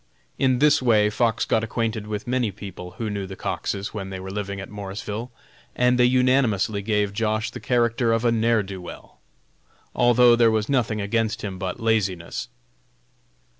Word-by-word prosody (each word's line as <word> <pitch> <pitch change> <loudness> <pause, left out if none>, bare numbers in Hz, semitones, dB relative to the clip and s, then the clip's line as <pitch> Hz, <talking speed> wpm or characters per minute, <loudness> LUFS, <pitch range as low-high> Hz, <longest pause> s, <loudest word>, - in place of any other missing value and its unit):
In 130 -2 +3
this 150 +2 +4
way 105 -4 +3
Fox 115 +1 +1
got 110 - +1
acquainted 110 -1 -2
with 105 -1 -4
many 125 -2 0
people 95 -2 -9
who 115 - -3
knew 100 -2 -3
the 95 - -8
Coxes 100 +1 -3
when 100 -3 -5
they 95 -1 -6
were 95 +1 -7
living 100 0 -4
at 95 - -7
Morrisville, 105 +3 -6 0.4
and 125 0 +2
they 125 - +6
unanimously 125 -5 +2
gave 105 -1 0
Josh. 110 0 -1
the - - -8
character 120 -1 +1
of 115 +1 +1
a 120 - +4
"ne'er 115 -1 +2
do 95 -1 -7
weel," 90 - -11 0.7
although 120 0 +5
there 115 -1 +5
was 110 -1 0
nothing 120 -6 0
against 110 +2 -1
him 95 -3 -5
but 95 -1 -3
his - - -11
laziness. 95 -6 -1
110 Hz, 175 wpm, -24 LUFS, 100-120 Hz, 0.7 s, they